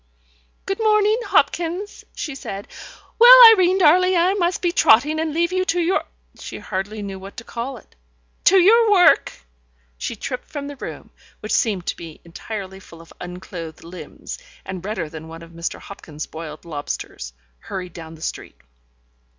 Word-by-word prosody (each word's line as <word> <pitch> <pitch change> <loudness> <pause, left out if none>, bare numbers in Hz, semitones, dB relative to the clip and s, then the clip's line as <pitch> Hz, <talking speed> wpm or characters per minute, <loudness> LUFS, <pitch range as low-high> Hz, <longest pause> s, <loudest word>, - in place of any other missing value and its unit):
"Good 390 +2 -3
morning, 430 0 +3
Hopkins," 350 +5 0
she 300 - -5
said. 200 -6 -7 0.5
"Well, - - +10 0.2
Irene 370 -2 +3
darling, 365 +2 +4
I 355 +3 +3
must 355 -3 0
be 350 -1 0
trotting, 300 0 +4
and 320 -1 -1
leave 340 +3 0
you 370 0 +1
to 355 -1 0
your 350 +3 0 0.2
" - - -27
she - - -7
hardly 205 +3 -5
knew 195 -1 -6
what 195 +4 -11
to 230 - -7
call 240 +3 -6
it - - -19 0.5
"to 385 - +6
your 440 +5 +5
work." 360 -5 +5 0.7
She - - -4
tripped 250 +4 -6
from 290 -2 -6
the 285 0 -7
room, - - -9 0.3
which 215 - -4
seemed 200 -6 0
to - - -2
be 165 -2 -11
entirely 190 +2 -7
full 165 -3 -15
of 165 - -15
unclothed 175 -2 -8
limbs, 180 - -9 0.3
and 190 -2 -7
redder 190 -5 -3
than 160 +1 -10
one 165 +1 -10
of 165 - -14
Mr. 170 0 -5
Hopkins's 155 -6 -9
boiled 155 -1 -9
lobsters 145 - -6 0.3
hurried 180 - -7
down 165 -1 -10
the 160 - -12
street. - - -6
220 Hz, 170 wpm, -21 LUFS, -, 0.7 s, Well